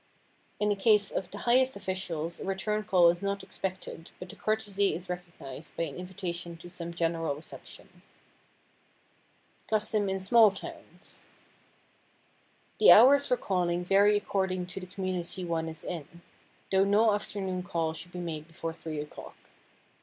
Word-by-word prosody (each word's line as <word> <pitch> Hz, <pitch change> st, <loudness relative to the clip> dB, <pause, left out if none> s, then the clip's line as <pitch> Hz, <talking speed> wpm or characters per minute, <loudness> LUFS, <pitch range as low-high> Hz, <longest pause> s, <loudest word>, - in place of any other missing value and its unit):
In 210 Hz, -, +2 dB
the 205 Hz, -, +2 dB
case 205 Hz, 0 st, +3 dB
of 185 Hz, -, -3 dB
the 205 Hz, -, -8 dB
highest 255 Hz, +2 st, +4 dB
officials 170 Hz, -3 st, -3 dB
a -, -, -6 dB
return 210 Hz, +3 st, -1 dB
call 180 Hz, -3 st, +5 dB
is 175 Hz, -, -7 dB
not 200 Hz, -1 st, -2 dB
expected 185 Hz, -3 st, -6 dB
but 180 Hz, -, -9 dB
the -, -, -10 dB
courtesy 205 Hz, -2 st, 0 dB
is 180 Hz, +2 st, -7 dB
recognized 170 Hz, -5 st, -8 dB
by -, -, 0 dB
an 150 Hz, -4 st, -5 dB
invitation 180 Hz, -2 st, -5 dB
to 175 Hz, +2 st, -12 dB
some 170 Hz, -1 st, -6 dB
general 165 Hz, -3 st, -1 dB
reception. 150 Hz, -, -13 dB, 1.6 s
[Sidenote: -, -, -20 dB
CUSTOM 215 Hz, -1 st, +1 dB
IN 190 Hz, 0 st, -1 dB
SMALL 215 Hz, +2 st, +6 dB
TOWNS] 195 Hz, -, -11 dB, 1.6 s
The 435 Hz, -, +9 dB
hours 280 Hz, +5 st, +8 dB
for 250 Hz, -, +2 dB
calling 180 Hz, -4 st, 0 dB
vary 200 Hz, +3 st, +5 dB
according 190 Hz, -3 st, -1 dB
to 180 Hz, +2 st, -7 dB
the 185 Hz, -, -9 dB
community 185 Hz, -1 st, -4 dB
one 165 Hz, -1 st, -1 dB
is 160 Hz, -1 st, -7 dB
in—though 175 Hz, +3 st, -4 dB
no 210 Hz, +2 st, +4 dB
afternoon 195 Hz, -3 st, -3 dB
call 165 Hz, -4 st, -2 dB
should 175 Hz, +2 st, -9 dB
be 180 Hz, -, -8 dB
made 160 Hz, -3 st, -5 dB
before 165 Hz, 0 st, -5 dB
three 160 Hz, -2 st, -6 dB
o'clock. 150 Hz, 0 st, -8 dB
185 Hz, 155 wpm, -29 LUFS, 170-200 Hz, 1.6 s, The